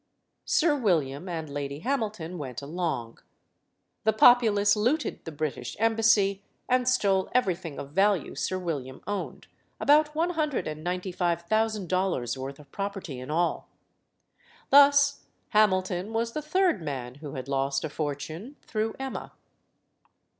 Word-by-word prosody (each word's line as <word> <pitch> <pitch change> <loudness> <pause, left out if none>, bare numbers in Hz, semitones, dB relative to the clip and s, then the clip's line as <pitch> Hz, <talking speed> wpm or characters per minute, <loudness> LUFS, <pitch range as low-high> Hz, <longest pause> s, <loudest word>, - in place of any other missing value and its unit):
Sir 310 -2 +3
William 170 - 0
and 165 -2 -4
Lady 140 0 -5
Hamilton 215 -10 -2
went 130 -2 -6
along. 150 -7 -3 0.8
The 220 - +3
populace 215 -3 +5
looted 245 +9 0
the 165 - -5
British 145 -5 -4
embassy 220 -3 +3 0.3
and 250 0 +2
stole 195 -7 +2
everything 180 - 0
of 140 - -7
value 195 +3 +2
Sir 185 - -2
William 145 -8 -5
owned 205 +1 -4 0.3
about 300 +1 +4
one 335 +3 +1
hundred 305 -5 -1
and 155 0 -6
ninety 180 +2 -2
five 175 -1 0
thousand 215 0 0
dollars' 185 -10 0
worth 135 +1 -6
of 145 -2 -17
property 195 -9 -5
in 130 +2 -8
all. 170 +3 0 1.0
Thus, 285 0 +6 0.3
Hamilton 185 -1 +2
was 230 +1 -1
the 305 - -2
third 345 - +1
man 130 -5 -5
who 145 -3 -7
had 130 0 -6
lost 135 0 0
a - - -1
fortune 155 - -5
through 220 0 -2
Emma. 265 0 -6
185 Hz, 140 wpm, -27 LUFS, 150-225 Hz, 1.0 s, Thus